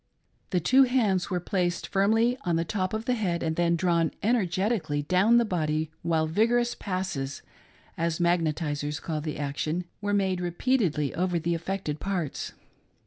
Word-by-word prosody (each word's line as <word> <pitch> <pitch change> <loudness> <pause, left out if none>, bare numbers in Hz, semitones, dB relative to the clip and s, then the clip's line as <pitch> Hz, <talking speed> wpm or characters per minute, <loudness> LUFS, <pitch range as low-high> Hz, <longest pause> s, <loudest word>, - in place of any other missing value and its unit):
The 180 - +1
two 255 +11 +5
hands 220 -8 +1
were 180 -2 0
placed 175 -1 -1
firmly 220 +5 +3
on 170 - +1
the 165 +1 0
top 185 0 -1
of 220 +1 -4
the 250 - +1
head 185 -8 -1
and 160 -1 -1
then 170 0 +2
drawn 170 -2 +2
energetically 195 -7 +1
down 190 +9 +4
the 235 - +4
body 155 -5 -1
while 165 -2 +1
vigorous 235 +8 +2
"passes" 185 -8 -4 0.3
— - - -30
as 165 -1 0
magnetizers 155 -3 0
call 155 -2 -3
the 155 0 -4
action 155 +4 -2
— - - -44
were 205 0 0
made 190 -2 +1
repeatedly 175 - 0
over 180 0 0
the 170 +1 0
affected 170 -2 -3
parts. 180 -7 -3
175 Hz, 165 wpm, -27 LUFS, 160-200 Hz, 0.3 s, two